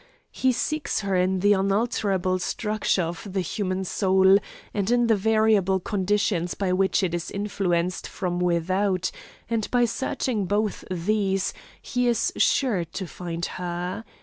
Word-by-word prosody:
He 260 Hz, -, +2 dB
seeks 285 Hz, 0 st, -1 dB
her 195 Hz, -2 st, -1 dB
in 185 Hz, 0 st, +1 dB
the 205 Hz, +1 st, +5 dB
unalterable 195 Hz, -2 st, +1 dB
structure 210 Hz, 0 st, 0 dB
of 175 Hz, +4 st, -6 dB
the 195 Hz, -, +1 dB
human 185 Hz, +1 st, -2 dB
soul, 190 Hz, +1 st, +4 dB, 0.3 s
and 200 Hz, 0 st, -1 dB
in 240 Hz, 0 st, +3 dB
the 225 Hz, -1 st, +4 dB
variable 215 Hz, -2 st, +3 dB
conditions 190 Hz, -2 st, 0 dB
by 190 Hz, -2 st, 0 dB
which 190 Hz, +1 st, +2 dB
it 175 Hz, -2 st, 0 dB
is 175 Hz, -1 st, -3 dB
influenced 185 Hz, -3 st, -1 dB
from 175 Hz, -2 st, -3 dB
without, 185 Hz, +2 st, +1 dB, 0.4 s
and 225 Hz, -2 st, -1 dB
by 245 Hz, -1 st, +3 dB
searching 230 Hz, -2 st, -1 dB
both 205 Hz, +1 st, 0 dB
these 195 Hz, +2 st, 0 dB, 0.3 s
he 250 Hz, -1 st, -1 dB
is 235 Hz, -1 st, +1 dB
sure 230 Hz, -10 st, +2 dB
to 170 Hz, +3 st, -6 dB
find 170 Hz, -1 st, -5 dB
her. 180 Hz, +3 st, -4 dB
195 Hz, 145 wpm, -25 LUFS, 180-215 Hz, 0.4 s, the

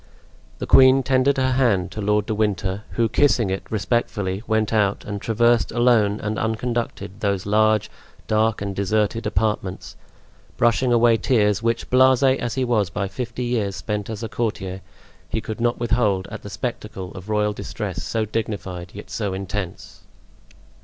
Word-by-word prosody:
The -, -, -4 dB
queen 130 Hz, 0 st, +6 dB
tendered 135 Hz, +1 st, +2 dB
her 130 Hz, 0 st, +2 dB
hand 110 Hz, -8 st, +2 dB
to 105 Hz, -, -5 dB
Lord 105 Hz, 0 st, +1 dB
de 110 Hz, -, -2 dB
Winter, 100 Hz, -2 st, -1 dB
who, 115 Hz, -1 st, +2 dB
kissing 120 Hz, -4 st, +2 dB
it 95 Hz, -, -2 dB
respectfully, 105 Hz, -3 st, -1 dB
went 110 Hz, 0 st, +1 dB
out 100 Hz, -2 st, +1 dB
and 100 Hz, -1 st, -5 dB
traversed 120 Hz, +1 st, +2 dB
alone 115 Hz, -4 st, +3 dB
and 110 Hz, +1 st, -2 dB
unconducted 110 Hz, -3 st, -3 dB
those 100 Hz, -3 st, -1 dB
large, 110 Hz, 0 st, +3 dB, 0.4 s
dark 110 Hz, -1 st, +1 dB
and 100 Hz, -1 st, -4 dB
deserted 105 Hz, +3 st, 0 dB
apartments, 105 Hz, -3 st, -2 dB, 0.6 s
brushing 120 Hz, +2 st, +2 dB
away 120 Hz, -1 st, +5 dB
tears 105 Hz, -5 st, +2 dB
which, 115 Hz, 0 st, -1 dB
blase 130 Hz, +1 st, +5 dB
as 130 Hz, -3 st, +1 dB
he 130 Hz, -1 st, 0 dB
was 110 Hz, -6 st, +1 dB
by 100 Hz, +3 st, -2 dB
fifty 125 Hz, +3 st, -5 dB
years 110 Hz, -5 st, -1 dB
spent 105 Hz, +5 st, -4 dB
as 110 Hz, 0 st, -5 dB
a -, -, -2 dB
courtier, 95 Hz, -5 st, -3 dB, 0.5 s
he 110 Hz, -, -1 dB
could 110 Hz, 0 st, -6 dB
not 120 Hz, 0 st, +1 dB
withhold 110 Hz, -5 st, +1 dB
at -, -, -7 dB
the 100 Hz, -, -8 dB
spectacle 100 Hz, -3 st, -5 dB
of 95 Hz, +1 st, -10 dB
royal 105 Hz, 0 st, +1 dB
distress -, -, -5 dB
so 110 Hz, -1 st, -1 dB
dignified, 100 Hz, -5 st, -4 dB
yet 105 Hz, -, -10 dB
so 100 Hz, -4 st, -2 dB
intense. 95 Hz, -1 st, -6 dB
110 Hz, 160 wpm, -22 LUFS, 100-120 Hz, 0.6 s, queen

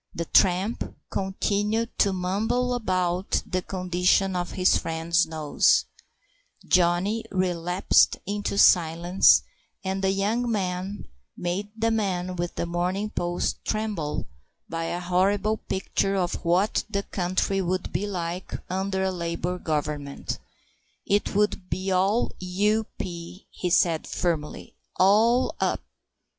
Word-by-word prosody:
The 170 Hz, -, -2 dB
tramp 190 Hz, +6 st, +2 dB, 0.2 s
continued 205 Hz, +4 st, -1 dB
to 200 Hz, -, +4 dB
mumble 220 Hz, +7 st, 0 dB
about 185 Hz, -5 st, 0 dB
the 185 Hz, -1 st, -2 dB
condition 185 Hz, +1 st, +1 dB
of 175 Hz, -1 st, -3 dB
his 185 Hz, 0 st, +3 dB
friend's 165 Hz, +2 st, +1 dB
nose, 155 Hz, -2 st, +2 dB, 0.8 s
Johnny 185 Hz, +5 st, +2 dB
relapsed 180 Hz, -1 st, +2 dB
into 205 Hz, 0 st, -2 dB
silence, 175 Hz, +1 st, +5 dB, 0.4 s
and 190 Hz, 0 st, -2 dB
the 190 Hz, -, +3 dB
young 210 Hz, +5 st, 0 dB
man 190 Hz, -1 st, -3 dB, 0.3 s
made 180 Hz, +4 st, -2 dB
the 225 Hz, +1 st, +1 dB
man 185 Hz, -4 st, -1 dB
with 175 Hz, 0 st, -3 dB
The -, -, -2 dB
Morning 180 Hz, +5 st, -2 dB
Post 175 Hz, -3 st, -2 dB
tremble 210 Hz, -9 st, -2 dB, 0.4 s
by 165 Hz, 0 st, -3 dB
a 175 Hz, -, -2 dB
horrible 195 Hz, +4 st, +1 dB
picture 195 Hz, 0 st, -1 dB
of 180 Hz, -2 st, 0 dB
what 180 Hz, +5 st, +2 dB
the 200 Hz, -2 st, -1 dB
country 185 Hz, +1 st, -1 dB
would 185 Hz, 0 st, -2 dB
be 190 Hz, +6 st, -1 dB
like 180 Hz, -2 st, -4 dB, 0.2 s
under 190 Hz, +1 st, -1 dB
a 190 Hz, -, +1 dB
Labour 175 Hz, 0 st, -3 dB
Government. 150 Hz, -3 st, -3 dB, 0.7 s
"It 205 Hz, 0 st, 0 dB
would 205 Hz, -3 st, +1 dB
be 190 Hz, +1 st, -2 dB
all 195 Hz, +5 st, +2 dB
U.P.," 185 Hz, -2 st, -2 dB
he 180 Hz, -, -3 dB
said 170 Hz, -2 st, +2 dB
firmly; 160 Hz, -4 st, -3 dB, 0.2 s
"all 225 Hz, +6 st, +4 dB
up...." -, -, +1 dB
185 Hz, 120 wpm, -25 LUFS, 175-200 Hz, 0.8 s, silence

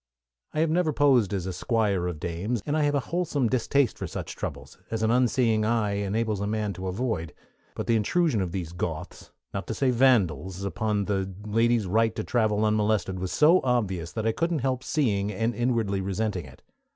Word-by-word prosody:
I 155 Hz, -, +2 dB
have 160 Hz, -1 st, +2 dB
never 170 Hz, -1 st, +2 dB
posed 135 Hz, -8 st, +3 dB
as 95 Hz, -3 st, -2 dB
a 95 Hz, -, -3 dB
Squire 100 Hz, -4 st, 0 dB
of 85 Hz, -4 st, -4 dB
Dames, 95 Hz, +7 st, -3 dB
and 145 Hz, -, -1 dB
I 155 Hz, -, +2 dB
have 145 Hz, 0 st, +1 dB
a -, -, +3 dB
wholesome 160 Hz, -7 st, 0 dB
distaste 130 Hz, +2 st, +1 dB
for -, -, -3 dB
such -, -, -6 dB
troubles -, -, -7 dB
as 110 Hz, -1 st, -2 dB
an 110 Hz, -, +3 dB
unseeing 120 Hz, -3 st, +2 dB
eye 110 Hz, -2 st, +1 dB
enables 105 Hz, +1 st, -1 dB
a 100 Hz, -, -1 dB
man 105 Hz, -1 st, -1 dB
to 95 Hz, +2 st, -6 dB
avoid; 95 Hz, -5 st, -2 dB, 0.4 s
but -, -, -3 dB
the 115 Hz, -, +2 dB
intrusion 120 Hz, -, +2 dB
of 90 Hz, -2 st, -2 dB
these 85 Hz, -3 st, -4 dB
Goths, 90 Hz, -, -5 dB, 0.2 s
not 100 Hz, -, -4 dB
to 110 Hz, -, -3 dB
say 135 Hz, -2 st, +2 dB
Vandals, 100 Hz, -, +2 dB
upon 100 Hz, +2 st, -1 dB
the 95 Hz, -1 st, -1 dB
lady's 115 Hz, +1 st, +2 dB
right 110 Hz, +4 st, +2 dB
to -, -, -3 dB
travel 110 Hz, -3 st, +1 dB
unmolested 105 Hz, -3 st, +1 dB
was 90 Hz, -1 st, -3 dB
so 155 Hz, -, +5 dB
obvious 95 Hz, -10 st, 0 dB
that 110 Hz, -1 st, -3 dB
I 115 Hz, -, +3 dB
couldn't 165 Hz, +1 st, -1 dB
help 130 Hz, -1 st, 0 dB
seeing 105 Hz, -9 st, 0 dB
and 115 Hz, +4 st, -1 dB
inwardly 115 Hz, -5 st, 0 dB
resenting 95 Hz, -2 st, -2 dB
it. 70 Hz, 0 st, -15 dB
110 Hz, 200 wpm, -26 LUFS, 95-125 Hz, 0.4 s, so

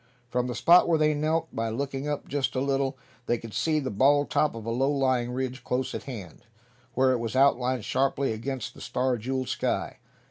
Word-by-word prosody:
From 125 Hz, 0 st, 0 dB
the 125 Hz, -, -4 dB
spot 175 Hz, +2 st, +6 dB
where 165 Hz, -2 st, +3 dB
they 155 Hz, 0 st, +3 dB
knelt, 155 Hz, +2 st, 0 dB
by 115 Hz, 0 st, -1 dB
looking 135 Hz, +4 st, -3 dB
up 145 Hz, -1 st, -3 dB
just 140 Hz, -1 st, -1 dB
a -, -, +1 dB
little, 135 Hz, 0 st, 0 dB, 0.3 s
they 120 Hz, -, +2 dB
could 115 Hz, -2 st, -10 dB
see 155 Hz, -1 st, +1 dB
the 135 Hz, -3 st, -3 dB
bald 140 Hz, +7 st, +3 dB
top 150 Hz, -5 st, +2 dB
of 115 Hz, -2 st, -7 dB
a 115 Hz, -, -2 dB
low 130 Hz, +4 st, +1 dB
lying 130 Hz, -4 st, +1 dB
ridge 130 Hz, +1 st, -3 dB
close 125 Hz, +1 st, -2 dB
at -, -, -5 dB
hand, 105 Hz, -, -8 dB, 0.5 s
where 130 Hz, 0 st, +4 dB
it 125 Hz, -, +1 dB
was 115 Hz, +1 st, -4 dB
outlined 130 Hz, -3 st, +3 dB
sharply 135 Hz, -1 st, +1 dB
against 125 Hz, +2 st, -4 dB
the -, -, -13 dB
star 130 Hz, 0 st, 0 dB
jeweled 130 Hz, +3 st, -3 dB
sky. -, -, -2 dB
130 Hz, 210 wpm, -27 LUFS, 125-140 Hz, 0.5 s, spot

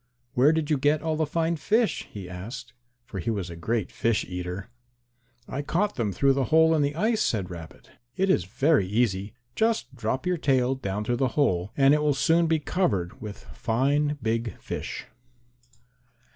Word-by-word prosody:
"Where 135 Hz, +5 st, +5 dB
did 160 Hz, -1 st, -1 dB
you 145 Hz, -, +2 dB
get 145 Hz, +3 st, +2 dB
all 160 Hz, -1 st, 0 dB
the 155 Hz, -1 st, 0 dB
fine 165 Hz, +2 st, 0 dB
fish?" 215 Hz, -, +1 dB
he 100 Hz, -3 st, -8 dB
asked, 115 Hz, +8 st, -8 dB, 0.3 s
for 95 Hz, -, -6 dB
he 85 Hz, -, -2 dB
was 100 Hz, -6 st, -2 dB
a -, -, -7 dB
great 105 Hz, +4 st, -2 dB
fish 115 Hz, -3 st, 0 dB
eater. 90 Hz, +4 st, -5 dB, 0.8 s
"I 140 Hz, -, -3 dB
caught 190 Hz, +8 st, 0 dB
them 110 Hz, -5 st, -1 dB
through 135 Hz, +8 st, +3 dB
the 135 Hz, -1 st, 0 dB
hole 160 Hz, +2 st, +5 dB
in 155 Hz, -, +2 dB
the 145 Hz, 0 st, 0 dB
ice," 220 Hz, +6 st, +1 dB
said 95 Hz, -5 st, 0 dB
Rabbit. 80 Hz, -3 st, -10 dB, 0.2 s
"It 195 Hz, -, +1 dB
is 90 Hz, -, +2 dB
very 135 Hz, -, +2 dB
easy. 105 Hz, -1 st, 0 dB, 0.2 s
Just 220 Hz, -11 st, 0 dB
drop 125 Hz, +2 st, -2 dB
your 180 Hz, -1 st, +1 dB
tail 130 Hz, -4 st, +2 dB
down 105 Hz, -5 st, -3 dB
through 120 Hz, +3 st, 0 dB
the 130 Hz, -, +2 dB
hole 95 Hz, -9 st, +2 dB
and 135 Hz, 0 st, +6 dB
it 150 Hz, -, +3 dB
will 150 Hz, -2 st, +2 dB
soon 165 Hz, +4 st, +3 dB
be 160 Hz, 0 st, +3 dB
covered 120 Hz, -, -1 dB
with 105 Hz, -2 st, -8 dB
fine 145 Hz, +5 st, +1 dB
big 115 Hz, 0 st, -1 dB
fish." -, -, -5 dB
130 Hz, 185 wpm, -26 LUFS, 105-155 Hz, 0.8 s, and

